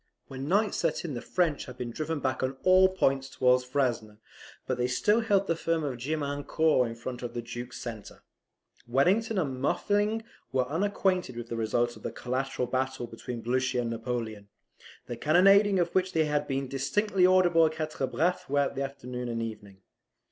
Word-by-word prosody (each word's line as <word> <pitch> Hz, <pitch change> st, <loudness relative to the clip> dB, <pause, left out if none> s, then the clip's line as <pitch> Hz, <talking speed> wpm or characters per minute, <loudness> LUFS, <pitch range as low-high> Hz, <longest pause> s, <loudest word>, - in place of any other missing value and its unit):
When 135 Hz, +1 st, -6 dB
night 205 Hz, +3 st, +2 dB
set -, -, -1 dB
in 155 Hz, -, -4 dB
the 120 Hz, -, -4 dB
French 170 Hz, -5 st, 0 dB
had 125 Hz, -, -10 dB
been 125 Hz, -2 st, -4 dB
driven 155 Hz, +3 st, -3 dB
back 130 Hz, -1 st, -1 dB
on 130 Hz, +1 st, -2 dB
all 185 Hz, 0 st, +6 dB
points 135 Hz, -7 st, 0 dB
towards 125 Hz, -1 st, +3 dB
Frasne; 125 Hz, -5 st, -1 dB, 0.5 s
but 130 Hz, -1 st, -2 dB
they 125 Hz, -, +2 dB
still 210 Hz, -, +2 dB
held 200 Hz, -3 st, +2 dB
the 165 Hz, -, 0 dB
farm 165 Hz, -1 st, -1 dB
of 130 Hz, -4 st, -3 dB
Gemiancourt 145 Hz, 0 st, +1 dB
in 115 Hz, -, -7 dB
front 120 Hz, +1 st, -6 dB
of 120 Hz, -, -6 dB
the 120 Hz, -, -2 dB
Duke's 120 Hz, +1 st, -7 dB
centre. 115 Hz, -4 st, -8 dB, 0.6 s
Wellington 195 Hz, -, +2 dB
and 135 Hz, -8 st, -1 dB
Muffling 205 Hz, +9 st, +1 dB, 0.3 s
were 130 Hz, -1 st, +1 dB
unacquainted 185 Hz, -1 st, 0 dB
with 120 Hz, 0 st, -6 dB
the 115 Hz, -, -3 dB
result 120 Hz, +2 st, 0 dB
of -, -, -15 dB
the -, -, -4 dB
collateral 130 Hz, 0 st, -2 dB
battle 130 Hz, -1 st, -2 dB
between 115 Hz, +1 st, -7 dB
Blucher 125 Hz, +1 st, 0 dB
and 115 Hz, -1 st, -3 dB
Napoleon, 115 Hz, -3 st, -4 dB, 0.6 s
the 120 Hz, -, -5 dB
cannonading 195 Hz, -, +5 dB
of 175 Hz, -1 st, 0 dB
which 185 Hz, 0 st, +1 dB
had 150 Hz, -2 st, +1 dB
been 135 Hz, 0 st, -2 dB
distinctly 180 Hz, +9 st, +2 dB
audible 175 Hz, -3 st, +5 dB
at 155 Hz, -, -5 dB
Quatre 155 Hz, -4 st, -2 dB
Bras 160 Hz, +9 st, 0 dB
throughout 140 Hz, 0 st, 0 dB
the 135 Hz, -, -4 dB
afternoon 125 Hz, -3 st, -5 dB
and 115 Hz, -1 st, -2 dB
evening. 105 Hz, -4 st, -8 dB
135 Hz, 180 wpm, -28 LUFS, 125-170 Hz, 0.6 s, all